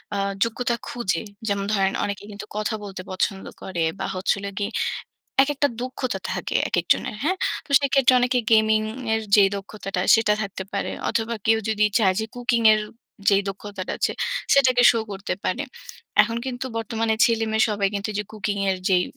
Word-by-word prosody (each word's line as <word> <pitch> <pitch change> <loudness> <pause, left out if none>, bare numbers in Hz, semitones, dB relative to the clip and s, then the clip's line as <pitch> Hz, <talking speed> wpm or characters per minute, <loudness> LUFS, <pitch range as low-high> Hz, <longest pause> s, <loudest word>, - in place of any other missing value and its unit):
আ - - -1 0.3
যোগ্যতা 235 +1 -1
খুঁজে 195 -8 -1 0.3
যেমন 200 -1 0
ধরেন 195 -2 +2
অনেকে 200 -1 -3
কিন্তু 205 - -8
কথা 215 +1 -1
বলতে 195 -2 -7
পছন্দ 195 +1 -1 0.2
করে 180 -3 -4 0.2
বা, - - -2
হচ্ছে 185 +2 +1
হলো 200 0 -4
গিয়ে 205 - -2 0.7
একেকটা 285 +1 +1
দক্ষতা 255 0 -3
থাকে - - -3
একেকজনের, - - +1
হ্যাঁ? 355 +6 +1 0.3
তো - - -23
সেইক্ষেত্রে 270 -2 +4
অনেকে 250 +1 +2
গেমিংয়ের 220 +1 +2
যেই 200 -2 +6
দক্ষতাটা, 195 -1 -5
সেটা 225 -2 +3
থাকতে 195 -2 -5
পারে। 200 - -2 0.2
অথবা, 230 +1 -1
কেউ 225 0 +4
যদি 215 -1 +2
চায় 190 -4 +3
যে 220 - -2
কুকিংয়ের 230 -3 +4 0.5
যেই 200 0 +5
দক্ষতাটা 195 -1 -5
আছে, - - +1 0.4
সেটাকে 255 -3 +5
শো 230 - +1
করতে 195 0 -4
পারে। 250 +10 0 0.6
এখন 230 +2 -2
কিন্তু 255 0 -4
বর্তমানে 225 0 0
ছেলেমেয়ে 220 -1 +2
সবাই 205 -2 +1
কিন্তু 200 +1 -2
ওইযে 210 0 -2
কুকিংয়ের 200 -3 -1
যেই 180 -2 +4
215 Hz, 160 wpm, -23 LUFS, 200-235 Hz, 0.7 s, যেই